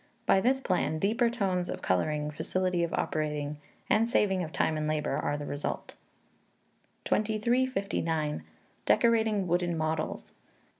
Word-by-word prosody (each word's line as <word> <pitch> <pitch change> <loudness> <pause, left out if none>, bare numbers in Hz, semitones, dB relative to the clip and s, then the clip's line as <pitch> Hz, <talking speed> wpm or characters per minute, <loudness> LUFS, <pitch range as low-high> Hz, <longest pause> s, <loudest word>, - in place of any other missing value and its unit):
By 190 - +4
this 265 +4 +2
plan, 180 -7 0
deeper 225 +7 +2
tones 190 -6 -1
of - - -5
colouring, 150 - 0
facility 180 +3 -1
of 170 - -1
operating, 150 -1 -2 0.3
and 225 +2 +3
saving 190 -5 +2
of 160 -3 -4
time 160 - +1
and 155 0 -1
labour, 155 -2 0
are 145 - -1
the 145 - -5
result. 145 0 -4 1.1
2359. 210 -9 0 0.5
Decorating 220 -4 +3
Wooden 175 -1 0
Models. 160 0 -2
180 Hz, 130 wpm, -29 LUFS, 155-215 Hz, 1.1 s, By